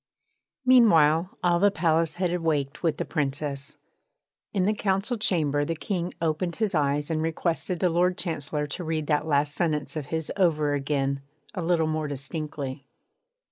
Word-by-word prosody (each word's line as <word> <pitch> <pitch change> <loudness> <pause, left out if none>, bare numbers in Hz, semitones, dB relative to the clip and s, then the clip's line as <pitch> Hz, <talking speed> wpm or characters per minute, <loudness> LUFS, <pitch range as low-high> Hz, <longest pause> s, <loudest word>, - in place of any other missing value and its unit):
Meanwhile 180 -9 +5
all 175 -1 +3
the 205 +2 +5
palace 165 -3 +1
had 180 -1 0
awaked 150 -5 -1
with 165 -3 +1
the - - -2
Princess. 145 -1 -2 0.7
In 190 -3 +1
the 210 - +3
Council 195 +3 0
Chamber 155 -9 +1
the 165 +3 -2
King 175 +1 -3
opened 165 +1 -1
his 215 -3 -1
eyes 145 0 +1
and 155 -1 0
requested 165 +2 -1
the 180 - +3
Lord 180 +2 +2
Chancellor 150 -3 -2
to 145 +5 -4
read 160 -2 -2
that 150 0 0
last 145 -1 +2
sentence 150 -1 -1
of 150 -3 -4
his 160 0 -2
over 155 -6 +2
again 140 -1 -1 0.3
a 185 - -3
little 165 -1 +2
more 155 -1 -1
distinctly. 140 -1 -5
160 Hz, 160 wpm, -26 LUFS, 145-175 Hz, 0.7 s, Meanwhile